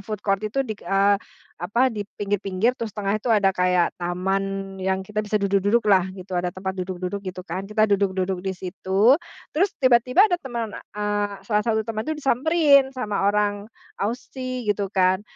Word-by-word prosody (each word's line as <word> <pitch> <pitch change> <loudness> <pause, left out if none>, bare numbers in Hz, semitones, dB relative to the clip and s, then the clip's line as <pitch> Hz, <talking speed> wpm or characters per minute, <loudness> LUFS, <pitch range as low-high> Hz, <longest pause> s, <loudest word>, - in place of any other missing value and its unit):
food 210 0 -6
court 195 -1 +1
itu 220 +6 -1
dik 215 -3 -6
eee, 200 +1 +2 0.4
apa, 210 +7 -1
di 205 - -2 0.2
pinggir-pinggir 205 +3 0
terus 230 -3 -5
tengah 205 -1 -2
itu 250 - -3
ada 200 -3 +3
kayak 180 -1 +2
taman 195 +2 -2
yang 190 0 +1
kita 210 0 -2
bisa 210 0 -1
duduk-duduklah 200 -1 +2
gitu, 185 0 -7
ada 180 0 0
tempat 190 +1 -5
duduk-duduk 185 +1 -4
gitu 185 -2 -6
kan. 185 +3 -4
Kita 215 0 +3
duduk-duduk 190 -2 0
di 195 - -2
situ 190 +5 +2 0.4
terus 375 +5 +2
tiba-tiba 255 - +5
ada 355 -4 0
teman 235 -4 -4
eee, 205 0 -3
salah 210 -2 +2
satu 220 -1 0
teman 220 -1 -3
tuh 315 - -1
disamperin 280 0 +4
sama 210 -6 -1
orang 205 0 -1 0.3
Aussie 255 +2 -4
gitu 200 -1 0
kan. 185 0 +2
205 Hz, 170 wpm, -23 LUFS, 190-230 Hz, 0.4 s, tiba-tiba